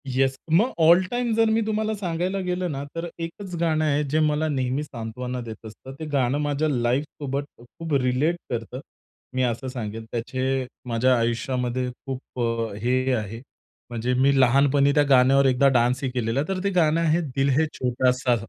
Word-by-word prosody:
Yes, 135 +1 +1
मग 215 +11 +4
all 170 +3 +7
time 245 -1 -1
जर 225 0 +3
मी 225 +1 +2
तुम्हाला 220 0 -1
सांगायला 185 0 -2
गेलो 180 0 -1
ना, 140 -4 -4
तर 165 +1 -3
एकच 175 +3 -6
गाणं 155 -2 +1
आहे 150 0 +1
जे 155 +3 +1
मला 155 0 +1
नेहमी 130 0 -1
सांत्वना 125 -1 -5
देत 115 -2 -9
असतं. 110 +4 -10
ते 160 - -5
गाणं 135 0 +2
माझ्या 145 +1 0
लाईफसोबत 135 +2 -1
खूप 150 +7 -8
रिलेट 130 +7 +1
करतं 120 +1 -4 0.6
मी 130 - +1
असं 125 +1 -1
सांगेल. 115 -3 -5
त्याचे 130 +2 -1 0.2
माझ्या 125 +2 +3
आयुष्यामध्ये 125 +2 -1 0.2
खूप 130 -1 -7
अ, 115 -2 -1
हे 130 +5 0
आहे 110 -1 -3 0.5
म्हणजे 120 +1 -2
मी 135 +2 +3
लहानपणी 140 +2 +4
त्या 145 - +4
गाण्यावर 135 +1 +5
एकदा 130 +1 +4
डान्सही 125 +3 +1
केलेला. 125 +2 -1
तर 190 -1 -3
ते 200 - +1
गाणं 165 -4 +2
आहे 165 +1 +2
दिल 135 0 +2
है 160 - +3
छोटासा. 125 0 +1
135 Hz, 170 wpm, -24 LUFS, 125-155 Hz, 0.6 s, all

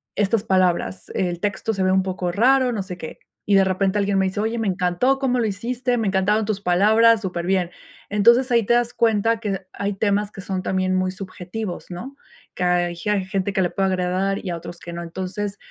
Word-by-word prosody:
estas 205 +1 +1
palabras. 175 - 0
El 175 -2 -1
texto 205 +2 -2
se 195 - -3
ve 185 - +3
un 190 0 +3
poco 185 -2 -2
raro, 250 +5 +3
no 205 -4 -2
sé 180 -2 -8
qué". 160 - -7 0.3
Y 205 - +3
de 195 - +6
repente 190 +1 0
alguien 200 -1 +1
me 190 - +2
dice: 195 +2 -4
"Oye, 225 +1 -1
me 220 - -1
encantó 185 +8 +1
cómo 250 -2 +1
lo 225 - +1
hiciste, 240 +4 -1
me 220 -3 0
encantaron 200 +3 +2
tus 205 -2 -2
palabras, 215 +5 +4
superbién". 180 -1 -1 0.4
Entonces, 235 +5 +4
ahí 235 -2 +4
te 235 - +3
das 240 0 +1
cuenta 225 0 +2
que 195 -4 -3
hay 200 0 -2
temas 205 +1 0
que 195 - -9
son 190 -1 -3
también 185 0 0
muy 185 0 +1
subjetivos, 185 +1 -6
¿no? 255 +11 -7 0.4
Que 180 - -2
hay 175 -1 +1
ge 190 +5 -4
hay 195 -2 0
gente 195 0 -2
que 190 - +1
le 175 - +1
puede 195 -1 0
agradar, 185 +2 -1
y 185 - -4
a 170 - -3
otros 170 +1 -9
que 170 - -8
no, 170 - -5
entonces, 190 +4 -4
195 Hz, 220 wpm, -22 LUFS, 185-220 Hz, 0.4 s, de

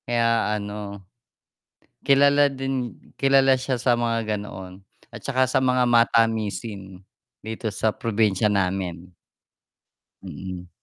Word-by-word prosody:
Kaya 115 -2 +1
ano, 100 -1 -7 1.0
kilala 140 +1 +5
din, 135 -3 -3 0.2
kilala 135 -1 +4
siya 130 0 -2
sa 120 -2 +2
mga 115 -2 -1
ganoon 95 -2 -9 0.3
at - - -9
'saka 130 -1 +2
sa 130 - +2
mga 125 -1 +2
matamisin 110 -4 0 0.4
dito 110 +1 -6
sa 110 - +1
probinsya 105 -3 0
namin. 90 -3 -2 1.1
Mm. 90 -1 -8
115 Hz, 105 wpm, -23 LUFS, 100-125 Hz, 1.1 s, kilala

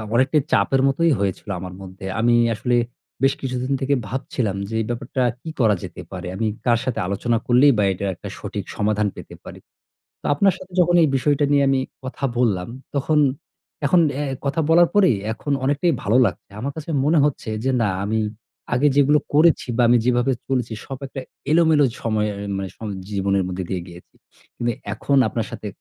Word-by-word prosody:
অনেকটাই 130 +5 +3
চাপের 130 +7 +3
মতোই 165 +4 +2
হয়েছিল 100 +1 -2
আমার 90 0 -7
মধ্যে। 95 0 -10
আমি 120 +1 +3 0.2
আসলে 120 +3 0 0.5
বেশ 135 - +4
কিছুদিন 130 0 -3
থেকে 135 +1 +1
ভাবছিলাম 115 -3 -2
যে, 110 - -4
"এই 110 - -2
ব্যাপারটা 125 +2 -2 0.2
কী 160 - -7
করা 110 -4 +4
যেতে - - -7
পারে?" - - -6
আমি 110 +2 -1 0.2
কার 120 -2 +3
সাথে 130 - -1
আলোচনা 115 +4 0
করলেই 125 +4 +6
বা 105 - +3
এইটার 95 +1 -2
একটা - - -8
সঠিক - - -5
সমাধান 105 0 +1
পেতে - - -10
পারি। - - -10 0.6
তো - - -4
আপনার 195 +5 +3
সাথে 185 -1 -13
যখন 175 0 +3
এই 155 - +4
বিষয়টা 145 +2 +2
নিয়ে 140 -1 +4
আমি 135 -1 +2 0.2
কথা 130 +1 -6
বললাম, 100 -7 +1 0.3
তখন 150 +2 +2 0.7
এখন 175 +5 +4
অ্যা 145 +2 -2 0.2
কথা 145 +4 0
বলার 170 +1 +6
পরেই 190 - +5 0.2
এখন 140 +6 -4
অনেকটাই 145 +5 +2
ভালো 110 +4 +3
লাগছে। - - -5
আমার 140 +3 -3
কাছে 160 +1 -6
মনে 155 +3 +3
হচ্ছে 140 -5 -1
যে, 135 - +2
"না 105 - +2 0.2
আমি 110 +2 0 0.6
আগে 140 +4 +4
যেগুলো 145 +1 +5 0.2
করেছি 155 -2 +4
বা 125 - +3
আমি 120 - +6
যেভাবে 125 +1 +2 0.2
চলেছি 125 -4 -1
সব 135 -1 -6
একটা 135 0 -7 0.3
এলোমেলো 160 -2 +5 0.2
সময়ে 110 -2 0
অ্যা 100 - -6
মানে 95 -1 -3
সম 110 - -5 0.2
জীবনের 100 -1 +1
মধ্যে 90 0 -4
দিয়ে 95 -2 -1
গিয়েছি। 85 0 -14 0.4
কিন্তু 120 -1 -1 0.2
এখন 140 +5 0
আপনার 115 - -2
সাথে 115 -3 -7
125 Hz, 185 wpm, -22 LUFS, 105-145 Hz, 0.7 s, করলেই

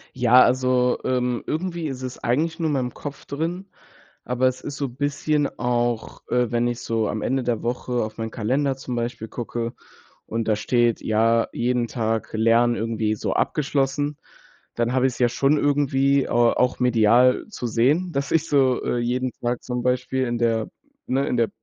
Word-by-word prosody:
Ja, 125 0 +6
also, 125 0 +2
ähm, 125 -1 0
irgendwie 170 0 -2
ist 130 -2 -6
es 130 -1 -6
eigentlich 160 +8 0
nur 165 - 0
in 150 - 0
meinem 125 -3 -1
Kopf 145 -1 -8
drin, 165 +6 -3 0.6
aber 125 +1 0
es 130 0 -2
ist 145 - -6
so 140 0 -2
bisschen 145 +3 -1
auch, 120 -1 -1
äh, 125 -2 +1
wenn 120 0 +1
ich 120 0 -3
so 115 -2 -1
am 105 +1 -3
Ende 135 +1 0
der 120 -2 -2
Woche 125 +1 -3
auf 110 +1 -7
meinen 115 0 -3
Kalender 130 +5 -1
zum 130 -2 -5
Beispiel 120 -1 -3
gucke 120 0 -4 0.5
und 115 0 -3
da 110 - +3
steht, 120 +2 +1
ja, 115 +1 +2
jeden 120 0 0
Tag 115 -2 -2
Lernen 115 +2 +3
irgendwie 110 -1 -1
so - - -2
abgeschlossen, 145 0 0 0.6
dann 120 +1 0
habe 130 0 +3
ich 130 - -2
es - - -11
ja 120 -1 +4
schon 140 +5 +2
irgendwie, 140 -1 +2
ah, 120 0 +3
auch 125 0 +2
medial 125 +1 +4
zu 190 - -6
sehen, 135 +11 +2
dass 140 -3 -2
ich 165 - +2
so, 130 -3 +2
äh, 120 - 0
jeden 125 +2 -1
Tag 120 0 -2
zum 125 -1 -3
Beispiel 125 +1 0
in 120 0 -1
der 115 -1 0 0.4
ne, 135 +2 +1
in - - 0
der 115 -1 +2
125 Hz, 185 wpm, -23 LUFS, 120-135 Hz, 0.6 s, Ja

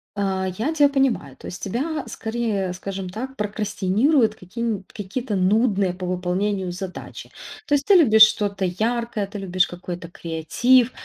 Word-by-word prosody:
А, 190 -2 -1
я 270 +9 -1
тя 290 -2 +5
понимаю. 265 - 0
То - - -14
есть - - -8
тебя 280 - -2
скорее, 220 -5 -2
скажем 190 0 -5
так, 255 +7 -6
прокрастинируют 210 +4 +1
каки 190 +4 -9
н 220 -5 -1
какие-то 210 +3 -4
нудные 195 -1 +2
по 180 0 -6
выполнению 185 +1 -1
задачи. 180 +1 -8 0.4
То 290 - +3
есть 280 0 -1
ты 405 - +5
любишь 220 -11 +8
что-то 200 -2 +2
яркое, 220 +2 -1
ты 205 +1 -8
любишь 185 -2 +1
какой-то 175 -1 -7
креатив, 225 +11 +2
205 Hz, 150 wpm, -23 LUFS, 185-235 Hz, 0.4 s, любишь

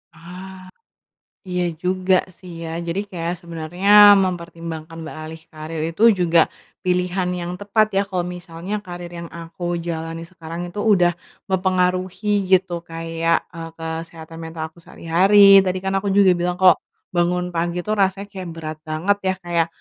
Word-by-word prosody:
Ah, 185 +2 -11 0.8
iya 180 0 -1 0.2
juga 185 +1 +1 0.3
sih 180 -2 -11
ya, - - -5 0.2
jadi 170 +4 -1
kayak 170 -1 -3
sebenernya 170 +2 -4 0.4
mempertimbangkan 165 -2 -6
beralih 155 0 -8
karier 155 0 -6
itu 185 - -4 0.2
juga 170 -1 +4 0.4
pilihan 180 0 0
yang 175 0 -4
tepat 210 +1 +2
ya. 195 - +4
Kalau 180 -2 -1
misalnya 180 +2 -6
karier 175 -1 -8
yang 170 - -8
aku 170 +1 -9 0.2
jalani 165 0 -4
sekarang 165 -1 -8
itu 205 +4 -6
udah 175 -3 +4 0.4
mempengaruhi 185 +1 0 0.2
gitu 185 -1 +3 0.2
kayak, 165 0 0 0.2
eee, 165 -1 -7
kesehatan 165 0 -7
mental 160 -1 -6
aku - - -22
sehari-hari, 195 +5 +5
tadi 185 0 -1
kan 190 - -1
aku 200 - -3
juga 200 -2 +6
bilang 175 0 -1
kalo 185 -3 +8 0.4
bangun 180 +1 +1
pagi 170 +1 -1
tuh 215 - 0
rasanya 195 +1 +1
kayak 185 -3 -6
berat 155 -1 -6
banget 165 +6 +1
ya 190 - +1
kayak, 170 -1 +1
175 Hz, 150 wpm, -21 LUFS, 165-185 Hz, 0.8 s, kalo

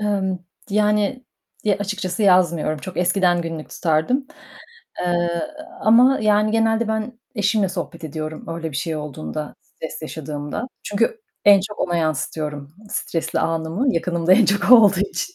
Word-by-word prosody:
Emm, 195 -3 0 0.3
yani, 210 +5 +1 0.4
ya 205 -2 +2
açıkçası 200 -1 -3
yazmıyorum. 170 -5 +3
Çok 185 +4 -8
eskiden 180 -1 +2
günlük 165 -2 -6
tutardım, 170 - 0 0.7
eee, 175 -1 0 0.4
ama 245 +5 +5
yani 210 0 +3
genelde 225 0 +2
ben 220 +2 -3 0.2
eşimle 205 -2 +1
sohbet 175 -3 -6
ediyorum 155 0 -6
öyle 165 -1 -4
bir 140 - -5
şey 160 +1 -2
olduğunda 150 - -6
stres 160 - -9
yaşadığımda. 150 - -5 0.2
Çünkü 230 - 0 0.2
en 200 -1 +8
çok 210 +2 -7
ona 175 -1 0
yansıtıyorum, 150 -2 -3 0.2
stresli 165 - -2
anımı 165 +10 0
yakınımda 170 +1 +1
en 225 +4 +6
çok 200 +3 +1
o - - +14
olduğu 200 -5 +5
için. 205 - -3
185 Hz, 140 wpm, -21 LUFS, 160-210 Hz, 0.7 s, o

